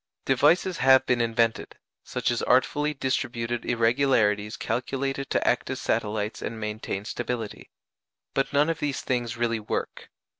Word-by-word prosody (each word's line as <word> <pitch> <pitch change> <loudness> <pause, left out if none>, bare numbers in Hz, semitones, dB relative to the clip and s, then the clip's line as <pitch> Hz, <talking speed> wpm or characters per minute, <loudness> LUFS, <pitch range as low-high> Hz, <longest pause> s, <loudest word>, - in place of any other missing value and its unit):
Devices 160 +7 +3
have 130 0 +6
been 125 -2 +2
invented, 115 0 0 0.3
such - - -1
as 120 - -1
artfully 145 +4 +2
distributed 120 -4 -2
irregularities 115 -3 +2
calculated 135 +2 -2
to - - 0
act - - +1
as - - -3
satellites 105 +1 -1
and 115 - -5
maintain 105 -2 -4
stability; 120 -2 -4 0.6
but 135 - 0
none 145 +3 +3
of 160 - -5
these 145 -3 -2
things 120 -2 -2
really 115 -1 0
work. 105 - -4
120 Hz, 140 wpm, -26 LUFS, 115-135 Hz, 0.6 s, have